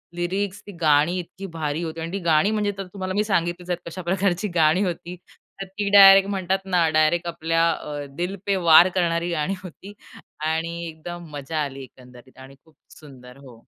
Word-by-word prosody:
Lyrics, 195 +3 -3
ती - - -8
गाणी 155 +3 +3
इतकी 185 +2 -9
भारी 155 +1 -2
होती. 165 0 -6
आणि 165 +1 -5
ती 195 - -2
गाणी, 160 +6 +3
म्हणजे 210 -1 0
तर 195 - -4
तुम्हाला 185 -2 -4
मी 210 +2 +1
सांगितलेच 175 -3 -2
आहे, 175 - 0
कशा 185 +2 -7
प्रकारची 185 +2 -1
गाणी 160 +3 +3
होती. 175 -1 -4 0.5
तर - - -4
ती 200 +2 -4
डायरेक्ट, 195 -1 +8
म्हणतात 190 -1 -1
ना 180 -3 +2
डायरेक्ट 155 +3 +2
आपल्या 165 0 0
अ, 145 -1 -6
दिल 180 +3 -3
पे 200 - +1
वार 165 +3 +8
करणारी 170 -1 0
गाणी 170 +3 -1
होती. 190 +3 -11 0.5
आणि 165 +2 -2
एकदम 170 +2 -9
मजा 145 +2 -5
आली 135 -1 -7
एकंदरीत 125 0 -17
आणि 135 +1 -13
खूप 160 -2 -26 0.2
सुंदर 130 -3 -14
हो. 130 -4 -15
170 Hz, 185 wpm, -23 LUFS, 155-190 Hz, 0.5 s, डायरेक्ट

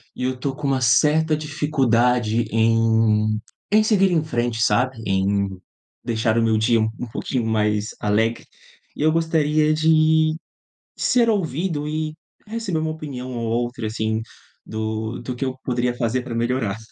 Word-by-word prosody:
e 125 - -5
eu 130 0 0
estou 135 +1 -3
com 150 -1 -3
uma 135 -1 +1
certa 150 +7 +3
dificuldade 125 -6 +1
em 110 -1 +2 0.3
em 215 +1 +6
seguir 195 -3 +3
em 165 -3 +2
frente, 120 -5 -2
sabe? 120 +4 +2
Em 100 +1 +1 0.5
deixar 110 0 0
o 115 - +3
meu 110 -1 +2
dia 115 +1 +3
um 110 - +1
um 125 - -4
pouquinho 120 +1 -3
mais 105 -1 0
alegre 110 +3 0 0.5
e - - -6
eu 155 - +4
gostaria 155 -2 +2
de, 155 0 +3 0.6
ser 235 -2 +3
ouvido 165 - -1
e 155 0 -2 0.3
receber 215 -6 -2
uma 155 0 -1
opinião 140 -5 -6
ou 115 -1 -3
outra, 120 -1 -2
assim, 110 0 -2 0.4
do 110 +1 -4
do 125 - -5
que 135 - -3
eu 130 0 -4
poderia 125 -1 0
fazer 120 +1 -1
pra 120 -2 -6
melhorar. 115 -3 -1
125 Hz, 155 wpm, -22 LUFS, 110-155 Hz, 0.6 s, em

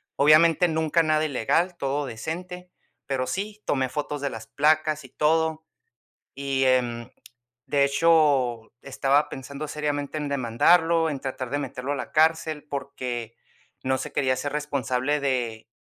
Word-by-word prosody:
Obviamente, 160 +4 +5
nunca 160 +1 +1
nada 155 0 +2
ilegal, 160 +6 0
todo 140 0 -1
decente, 180 +9 -6 0.3
pero 130 -2 -2
sí, 205 +3 -4
tomé 130 -2 0
fotos 145 0 -4
de 140 - -1
las 115 -3 -8
placas 155 0 +1
y 130 - -13
todo, 160 +2 +1 0.7
y, 135 -1 0
em, 120 -2 +1 0.6
de 140 -1 +2
hecho, 140 -6 +2
estaba 140 +1 +1
pensando 140 +3 -7
seriamente 145 0 -3
en 150 - -3
demandarlo, 160 +6 +3
en 140 -3 -4
tratar 130 -1 -5
de 145 - -1
meterlo 130 -1 -4
a - - -2
la 135 - -6
cárcel, 160 -1 +2
porque 125 -5 -5 0.5
no 130 0 +1
se - - -6
quería 130 -2 +1
hacer 145 +2 -3
responsable 145 -1 -1
de, 120 -5 -2
145 Hz, 145 wpm, -25 LUFS, 130-155 Hz, 0.7 s, Obviamente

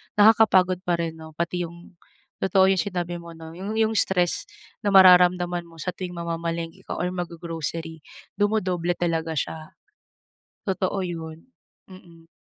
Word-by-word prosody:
Nakakapagod 205 -4 +5
pa 175 - +3
rin 165 -1 -4
'no? 160 -1 -11
Pati 170 +1 -2
yung 170 +1 -15 0.4
totoo 190 0 +4
yung 190 - +1
sinabi 175 -3 -3
mo 170 -1 -11
'no? 160 0 -10
Yung 195 +5 -5
yung 220 0 +2
stress 185 -5 +1 0.3
na 205 - -4
mararamdaman 180 -2 +6
mo 165 - -17
sa 165 +3 -4
tuwing 180 0 -7
mamamalengke 170 +1 -4
ka - - -3
or 180 0 -2
mag-go-grocery, 165 -2 -5 0.4
dumodoble 185 -5 +1
talaga 165 -2 -1
siya. 160 +2 -2 1.1
Totoo 190 0 -1
yun. 165 +3 -7 0.4
Mhm. 170 -3 -15
175 Hz, 140 wpm, -24 LUFS, 165-185 Hz, 1.1 s, mararamdaman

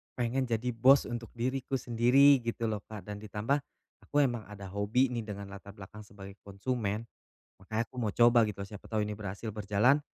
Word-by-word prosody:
pengen 125 +2 0
jadi 120 +1 -1
bos 130 +4 +6
untuk 120 -2 -5
diriku 130 +3 -2
sendiri, 125 +4 +5
gitu 115 -1 -2
loh 105 - -2
Kak. 105 -4 -8
Dan 105 -1 -6
ditambah, 110 +7 -1 0.4
aku - - -15
emang 120 -4 -1
ada 100 -2 -9
hobi 105 +6 +2
nih 120 -2 -2
dengan 100 -1 -6
latar 100 0 -10
belakang 105 +1 -11
sebagai 100 -1 -11
konsumen. 105 +1 -3 0.6
Makanya 110 +4 -1
aku - - -21
mau 110 -3 0
coba 120 -1 +6
gitu, 100 -1 -5
siapa 105 -1 -11
tahu 110 -1 +1
ini 105 - -4
berhasil 105 +2 -5
berjalan, 105 +7 +3
110 Hz, 185 wpm, -31 LUFS, 105-125 Hz, 0.6 s, bos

